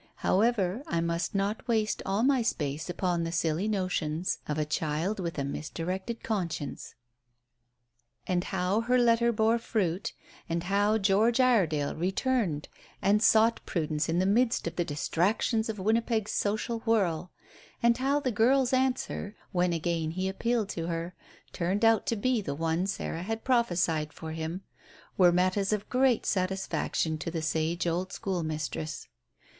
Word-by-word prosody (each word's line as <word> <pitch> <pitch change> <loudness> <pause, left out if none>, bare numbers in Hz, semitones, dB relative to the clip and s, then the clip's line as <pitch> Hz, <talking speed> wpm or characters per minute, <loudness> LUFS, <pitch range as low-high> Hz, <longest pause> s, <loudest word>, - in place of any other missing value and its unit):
However, 205 0 +2
I 170 - 0
must 170 +3 -1
not 200 +4 -1
waste 220 -2 +1
all 195 +4 +1
my 265 -1 +3
space 150 -7 -2
upon 175 -1 0
the 165 - -3
silly 165 +3 0
notions 185 -5 -1
of 150 - -2
a 155 - 0
child 160 +6 -1
with 170 -3 -3
a 140 - 0
misdirected 180 - -4
conscience." 170 -9 -3 1.3
And 180 -1 0
how 190 +3 0
her 250 +2 +2
letter 235 -1 +4
bore 225 +1 +2
fruit, 195 -5 -1 0.4
and 170 0 -1
how 205 +3 +2
George 215 +4 +3
Iredale 180 - +3
returned 190 - 0 0.3
and 205 +2 +3
sought 225 +1 +4
Prudence 155 -2 -1
in 165 - +1
the 185 - +2
midst 230 +4 +2
of 170 0 -3
the 175 - +1
distractions 190 - 0
of 220 - -3
Winnipeg's 220 +1 0
social 215 +3 -1
whirl, 185 -7 0 0.5
and 235 0 +5
how 275 +2 +2
the 260 -3 -1
girl's 250 +4 +3
answer, 255 -5 0 0.2
when 180 -2 +1
again 165 -1 -1
he 185 +3 -2
appealed 220 +2 -1
to 165 -1 -4
her, 170 +1 -3 0.4
turned 190 +6 0
out 225 -2 +4
to 230 - +1
be 240 +2 +1
the 140 -8 -4
one 165 +4 0
Sarah 180 -3 -3
had 225 +4 -4
prophesied 175 - +1
for 160 -1 -7
him, 160 +4 -4 0.5
were 180 -2 +6
matters 185 +3 +1
of 210 -1 -1
great 255 -2 +3
satisfaction 185 -4 -1
to 165 - -3
the 165 -1 -3
sage 160 +2 0
old 175 +2 -1
school 190 -5 -2
mistress. 155 0 -4
190 Hz, 155 wpm, -29 LUFS, 165-225 Hz, 1.3 s, were